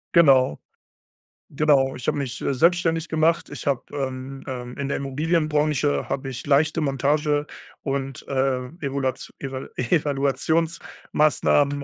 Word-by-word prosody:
Genau. 135 - +5 1.0
Genau. 140 -3 +3
Ich 125 - -7
habe - - +1
mich, 135 -2 -4
äh, - - 0
selbstständig 165 +2 +2
gemacht. 160 +1 +2
Ich 145 0 -7
habe, 135 -3 +1
ähm, 135 -1 -4
ähm 125 -2 -6
in 140 -1 -2
der - - -1
Immobilienbranche 150 0 0
habe 135 0 -2
ich 130 +1 -7
leichte 155 +3 +3
Montage 145 +1 +1 0.4
und, 135 -1 -3
äh, 130 -2 0
Evulats 135 -2 -2
Eva 135 -1 -5
Evaluationsmaßnahmen 145 +1 +1
140 Hz, 120 wpm, -24 LUFS, 135-155 Hz, 1.0 s, Genau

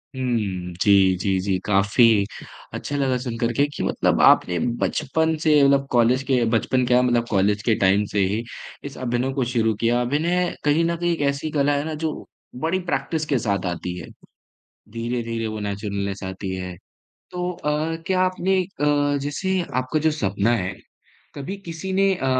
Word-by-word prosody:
हुँ, 105 -9 -2
जी, 100 -2 +5
जी, 95 +1 0
जी। 95 0 0
काफ़ी 105 +1 +4 0.5
अच्छा 145 - -4
लगा 135 -2 +1
सुनकर 120 -2 -2
के 140 +5 +3
कि - - -3
मतलब - - +1
आपने 90 -1 +5 0.2
बचपन 160 +2 0
से 150 -2 +5
मतलब 140 0 +3
कॉलेज 125 +2 +3
के 125 -3 +3
बचपन 125 +3 +1
क्या 125 0 +4
मतलब 120 -2 +2
कॉलेज 105 +1 +1
के 115 -1 +2
टाइम 100 +2 +3
से 105 - 0
ही 105 +4 -2 0.4
इस 140 -1 -7
अभिनय 125 +1 -1
को 135 -1 0
शुरू 115 -2 +1
किया। 120 +1 +2
अभिनय 170 +8 0
कहीं 150 +3 +3
न 170 0 0
कहीं 175 0 0
एक 165 - -4
ऐसी 140 +2 -3
कला 145 -1 +2
है 140 - -1
ना 160 - -3
जो 155 - 0 0.5
बड़ी 170 +4 +1
प्रैक्टिस 155 +4 -1
के 140 -4 +1
साथ 100 -4 -1
आती 90 0 -4
है। - - -9 0.9
धीरे-धीरे 115 -1 -3
वो 110 -1 -4
नैचुरलनेस 100 -1 -3
आती 95 0 -5
है। 90 -1 -6 0.6
तो 180 0 -2
अ, 155 -1 -2
क्या 185 -1 +2
आपने 185 +1 +1 0.2
क 145 -1 +2
जैसे 185 +7 -1 0.2
आपका 130 +4 0
जो 160 +1 +2
सपना 105 -6 0
है 95 -3 -2 0.6
कभी 145 +8 -5
किसी 170 +3 -5
ने 195 0 +3
अ, 135 - -4
125 Hz, 175 wpm, -23 LUFS, 105-150 Hz, 0.9 s, जी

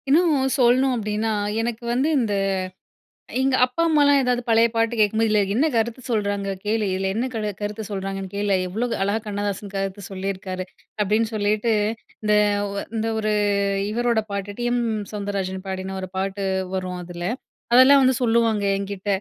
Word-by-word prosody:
இன்னும் 285 -4 +3
சொல்லணும் 255 +2 +4
அப்படீன்னா, 215 0 -1 0.3
எனக்கு 235 0 -3
வந்து 260 +5 +1
இந்த, 220 -4 0 1.1
எங்க 265 0 +2
அப்பா, 255 +6 -3
அம்மாலாம் 285 -2 +5
ஏதாவது 250 -1 +1
பழைய 230 0 +5
பாட்டு 230 +1 +1
கேட்கும்போது, 220 +2 +3
"இதுல 210 -1 +3
என்ன 270 +7 +3
கருத்து 230 +2 0
சொல்றாங்க 205 -2 -1 0.2
கேளு! 215 0 +1
இதுல 190 +1 -1
என்ன 235 +3 0
கரு 215 -2 -2
கருத்து 210 +1 -3
சொல்றாங்கன்னு 195 -1 -4
கேளு. 200 -1 +1
எவ்ளோ 225 +7 -1 0.2
அழகா 200 +3 0
கண்ணதாசன் 205 -1 -3
கருத்து 195 +1 -3
சொல்லிருக்காரு." 185 -1 -4 0.4
அப்படீன்னு 215 +3 +1
சொல்லிட்டு 215 +2 +1 0.5
இந்த, 210 0 +2 0.4
ஒ - - -6 0.2
இந்த 220 +1 -1
ஒரு, 215 -1 0 0.6
இவரோட 235 0 +1
பாட்டு, 200 0 -4
'டி.எம். 240 0 +1 0.3
சௌந்தரராஜன்' 195 -2 -3
பாடின 190 0 -4
ஒரு 185 - -6
பாட்டு 195 +1 -2 0.3
வரும் 185 -1 -3
அதுல. 175 0 -6 0.5
அதெல்லாம் 265 +3 +8
வந்து 260 0 +4
சொல்லுவாங்க 225 -3 +2
என்கிட்ட. 200 0 -5
215 Hz, 150 wpm, -23 LUFS, 195-240 Hz, 1.1 s, அதெல்லாம்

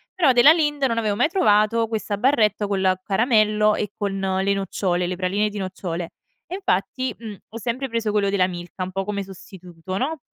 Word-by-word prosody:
Però 330 -8 +4
della 245 +5 +7
Lindt 295 -4 0
non 230 -3 0
avevo 215 -3 0
mai - - +3
trovato 225 - +3
questa 215 -2 -3
barretta 215 -4 +2
col 190 -2 +1
caramello 215 0 +2
e 210 - -3
con 200 -1 -2
le 190 +1 0
nocciole, 185 -2 -1
le 185 - -3
praline 195 +3 0
di 210 - -8
nocciole. 180 -3 -5 0.4
E 365 - -5
infatti, 365 - -1
mhmm, 220 -3 -8
ho 225 - -8
sempre 250 +4 -3
preso 230 -2 -1
quello 205 -1 +1
della 195 -2 +2
Milka, 175 +1 -6
un 185 - -5
po' 195 +1 -2
come 205 0 -3
sostituto, 185 -1 -9
no. 300 +8 -2
210 Hz, 190 wpm, -22 LUFS, 190-230 Hz, 0.4 s, della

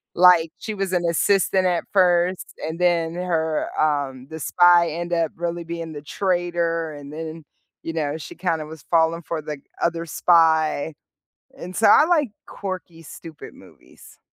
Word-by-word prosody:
Like, 175 -2 +6
she 215 - -5
was 195 -2 -3
an 175 -1 +1
assistant 190 +2 +2
at 175 -2 0
first, 180 -1 +2
and 160 +2 -5
then 170 -2 +1
her, 160 -3 -1
um 140 -4 0
the 160 - -6
spy 175 +1 +4
end 175 +2 -4
up 165 -2 +1
really 170 0 -3
being 165 -1 -6
the 145 - -7
traitor, 170 -2 -1
and 145 0 -10
then, 160 0 -7 0.4
you 165 - -4
know, 155 -1 -2
she 155 - -9
kinda 165 -4 -2
was 155 -1 -11
falling 165 0 +3
for 160 -1 -4
the 150 -2 -6 0.2
other 170 0 0
spy, 160 -2 +3 0.6
and 180 +1 -8
so 220 - +3
I - - +7
like 305 - +2 0.2
quirky 185 -4 -7
stupid 160 0 -11
movies. - - -18
170 Hz, 160 wpm, -22 LUFS, 160-175 Hz, 0.6 s, I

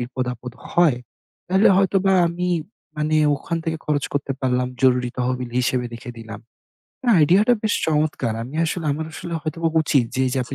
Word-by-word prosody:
বিপদ 125 +1 -3
আপদ 125 +1 -9 0.2
হয়, 170 -8 +4 0.5
তাইলে 190 +3 +4
হয়তোবা 195 0 +2 0.2
আমি 180 +1 -2 0.5
মানে 155 +1 +1 0.2
ওখান 165 +4 -4
থেকে 160 0 -1
খরচ 145 -2 0
করতে 140 -1 -1
পারলাম 125 -1 0
জরুরি 125 -1 +3
তহবিল 125 0 -2
হিসেবে 125 0 0
রেখে 120 +1 -8
দিলাম। 110 -2 -9 0.6
না - - 0
আইডিয়টা 190 +10 +5
বেশ 215 - +1
চমৎকার। 150 -7 0
আমি 125 +5 -9
আসলে, 165 0 -3
আমার 155 +2 -4
আসলে 170 +1 -6
হয়তোবা 165 +2 -1
উচিত 140 -4 +2
যে 130 - 0
এইযে 130 +1 -1
আপনি 130 - -7
145 Hz, 170 wpm, -22 LUFS, 125-170 Hz, 0.6 s, আইডিয়টা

